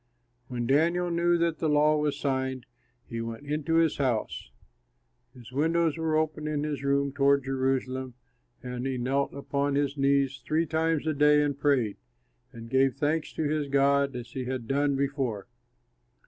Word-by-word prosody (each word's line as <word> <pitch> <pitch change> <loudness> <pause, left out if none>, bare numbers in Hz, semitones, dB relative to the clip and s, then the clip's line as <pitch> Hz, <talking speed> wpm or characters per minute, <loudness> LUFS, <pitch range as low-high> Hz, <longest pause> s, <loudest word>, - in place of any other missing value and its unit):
When 120 -2 -3
Daniel 170 +7 +2
knew 170 +1 +2
that 170 -1 0
the 160 - 0
law 150 +1 +4
was 150 -1 0
signed, 130 -2 -2 0.4
he 115 -1 -5
went 115 +4 -6
into 150 +2 -1
his 165 -2 +3
house. 120 - -1 0.9
His 125 -1 -13
windows 160 +3 +1
were 160 -1 0
open 155 -1 -1
in 150 -1 -1
his 150 -2 -3
room 140 0 +1
toward 140 -1 +3
Jerusalem, 130 -1 -2 0.5
and 125 +1 -4
he 130 -1 -2
knelt 135 +3 0
upon 140 0 -2
his 145 0 0
knees 140 -1 +1
three 160 +2 +1
times 160 0 0
a 155 - +1
day 150 0 +4
and 145 -1 -1
prayed, 135 -7 +1 0.5
and 115 0 -10
gave 130 +1 +2
thanks 155 +2 -1
to 160 - -2
his 150 -1 -1
God 140 0 +2
as 120 -1 -7
he 130 -1 -4
had 125 -2 -4
done 140 +1 +1
before. 135 -7 -2
140 Hz, 165 wpm, -28 LUFS, 130-150 Hz, 0.9 s, law